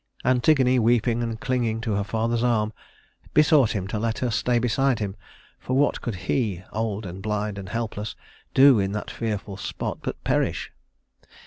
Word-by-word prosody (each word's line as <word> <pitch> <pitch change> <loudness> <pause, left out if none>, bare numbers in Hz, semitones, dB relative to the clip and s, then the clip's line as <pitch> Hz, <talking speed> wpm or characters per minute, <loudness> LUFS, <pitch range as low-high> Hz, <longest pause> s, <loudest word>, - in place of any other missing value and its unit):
Antigone, 130 0 +4
weeping 120 0 +2
and 115 -1 -3
clinging 120 -3 0
to 115 -3 -1
her 100 0 0
father's 115 +3 -1
arm, 110 -3 +1 0.6
besought 150 -6 +5
him 95 -3 -3
to 105 - -2
let 115 0 -1
her 125 -2 -1
stay 120 +3 +1
beside 125 +2 +2
him, 100 -2 -3 0.4
for 130 - -1
what 145 +1 +2
could 115 - -3
he 100 -8 0
old 110 -1 -2
and 95 +1 -7
blind 105 0 -2
and 95 -1 -8
helpless 110 -2 -4 0.4
do 135 -3 +7
in 95 0 -1
that 105 - -4
fearful 105 -4 -4
spot 100 - -4
but - - -5
perish? - - 0
115 Hz, 165 wpm, -25 LUFS, 105-125 Hz, 0.6 s, do